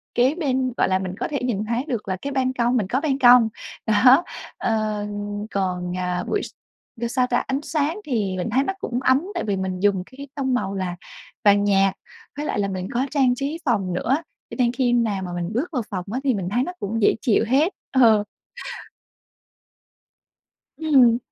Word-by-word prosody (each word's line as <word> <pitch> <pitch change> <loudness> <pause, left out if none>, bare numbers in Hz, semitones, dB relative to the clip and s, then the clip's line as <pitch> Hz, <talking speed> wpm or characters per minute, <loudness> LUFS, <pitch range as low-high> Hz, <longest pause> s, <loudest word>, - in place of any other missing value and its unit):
kế 255 +5 +3
bên, 260 -6 0
gọi - - +3
là, 185 0 +2
mình 190 -1 -4
có - - -1
thể 285 -3 -2
nhìn 215 -4 -1
thấy 235 +4 -1
được 235 -7 -3
là 190 -1 -2
cái 280 - -4
ban 260 -1 +1
công 245 0 +1
mình 200 -4 0
có 260 +7 0
ban 280 -3 0
công. 245 -3 +7 0.4
Đó, 250 +8 +6 0.3
ờ, 215 -2 -1 0.5
còn, 180 -2 -2
à, 180 -1 -2
buổi 420 - 0
s - - -6 0.5
ơ, 235 - 0
sao 250 +1 +1
ta, 245 - +1
ánh 270 +2 -1
sáng 310 +5 -1
thì 205 -9 -1
mình 180 +5 -2
thấy 260 +4 +3
nó 385 - -2
cũng 245 +1 -2
ấm 260 +1 +4
tại - - -1
vì 205 -2 -1
mình 190 -1 -3
dùng 195 -2 +2
cái 280 +2 -11
tông 265 -2 -1
màu 200 -5 -1
là 185 -2 -3 0.5
vàng 205 0 +5
nhạt 195 -1 +3 0.4
với 295 - -3
lại 205 - -1
là 200 - +1
mình 185 -1 -4
có 255 +3 +1
trang 260 -4 +3
trí 285 +5 -3
phòng 200 -8 0
nữa, 255 +10 +1 0.3
cho - - -7
nên 240 -1 +3
khi 245 -1 +1
nào 220 -5 +1
mà 180 - -5
mình 175 +3 -3
bước 265 +10 -1
vào 255 -6 -1
phòng 185 -3 -4
á, 255 - -1
thì 265 - +2
mình 185 -4 -3
thấy 245 +5 +1
nó 360 - -4
cũng 225 +3 -2
dễ - - +4
chịu 225 -2 +3
hết. 295 - +3 0.2
Ờ. 225 -5 +5 2.5
Ừm. 265 -7 +5
235 Hz, 210 wpm, -23 LUFS, 195-265 Hz, 2.5 s, công